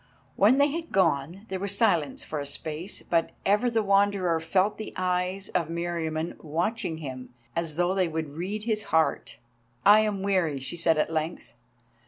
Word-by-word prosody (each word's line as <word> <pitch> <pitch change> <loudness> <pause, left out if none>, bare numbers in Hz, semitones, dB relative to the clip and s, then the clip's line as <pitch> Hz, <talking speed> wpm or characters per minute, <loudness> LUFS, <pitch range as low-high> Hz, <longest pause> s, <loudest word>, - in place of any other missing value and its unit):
When 215 +7 +5
they 285 +1 +4
had 330 +2 -5
gone 170 +1 +1
there 190 0 -3
was 200 +1 0
silence 170 -10 +2
for 155 - -4
a 140 - -4
space, 160 +7 -4
but 165 -1 0
ever 210 +5 +3
the 225 -2 +1
Wanderer 195 -4 +2
felt 185 +6 +1
the 215 - -6
eyes 185 +1 -1
of 175 -4 0
Meriamun 165 -1 -3
watching 165 +3 -2
him 130 -5 -8 0.2
as 165 -2 -2
though 175 +2 +1
they 190 -2 +2
would 160 -3 -4
read 190 +7 -4
his 215 -2 -1
heart. 160 0 +1 0.5
"I 210 +2 +8
am 210 -3 0
weary," 180 -8 +1
she 135 +6 -4
said, 165 -2 +2
at 155 +1 0
length. 160 +2 -3
180 Hz, 175 wpm, -27 LUFS, 160-200 Hz, 0.5 s, I